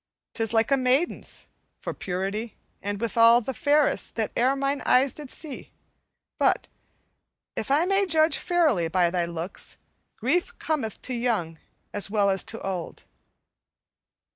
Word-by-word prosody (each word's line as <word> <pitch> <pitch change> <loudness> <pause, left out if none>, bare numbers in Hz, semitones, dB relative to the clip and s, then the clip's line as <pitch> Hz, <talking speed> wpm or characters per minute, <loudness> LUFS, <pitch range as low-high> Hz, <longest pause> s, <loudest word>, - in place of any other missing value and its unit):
'Tis 225 -2 0
like 225 +2 +2
a 275 - +5
maiden's 260 +6 0 0.3
for - - -4
purity, 195 +5 -3 0.3
and, 205 0 -3
withal, 230 +1 +5
the 255 +3 -4
fairest 290 +4 +2
that 220 -2 -1
e'er 255 +3 +3
mine 275 +1 -1
eyes 260 +1 +4
did 295 -3 -8
see; 295 -1 -6 0.7
but, - - +2 0.9
if - - -3
I 295 +5 +3
may 390 +1 +2
judge 315 -2 +4
fairly 315 - +2
by 175 0 +2
thy 175 -1 0
looks, 170 +2 -4 0.4
grief 350 - 0
cometh 275 -10 -2
to 255 - -4
young 220 -10 -1 0.3
as 205 -1 +1
well 200 -1 +2
as 190 - +1
to 225 - -5
old." 185 -4 -5
235 Hz, 140 wpm, -26 LUFS, 200-285 Hz, 0.9 s, a